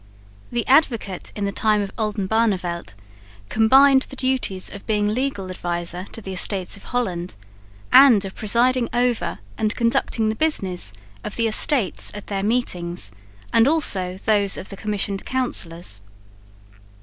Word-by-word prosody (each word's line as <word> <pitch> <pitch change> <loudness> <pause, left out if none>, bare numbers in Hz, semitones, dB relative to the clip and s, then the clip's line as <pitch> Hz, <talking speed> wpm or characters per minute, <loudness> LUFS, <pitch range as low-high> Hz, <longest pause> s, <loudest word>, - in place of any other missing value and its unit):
The 240 -1 -2
Advocate 235 - +1
in 205 - -2
the 200 - -1
time 215 +1 +2
of 200 -1 -4
Oldenbarneveldt 205 - -1 0.5
combined 265 +5 +5
the - - -9
duties 255 -8 -2
of 200 - -10
being 210 -1 +1
legal 235 -7 -3
adviser 175 0 -4
to 225 - -9
the 190 - -6
Estates 185 0 0
of 200 - -11
Holland, 185 -8 -3 0.6
and 240 -8 +7
of 190 - -7
presiding 240 +3 +2
over 240 - 0 0.2
and 215 0 0
conducting 230 -2 +1
the 220 - -2
business 190 - +1 0.3
of 210 - -5
the 230 -1 +1
Estates 225 -1 +2
at 205 - -7
their 195 -1 -3
meetings, 180 - -1 0.4
and 230 +2 +5
also 190 - +2
those 205 -2 +3
of - - -8
the 195 - -7
Commissioned 200 -1 -2
Councillors. 170 - -2
210 Hz, 140 wpm, -22 LUFS, 185-240 Hz, 0.6 s, and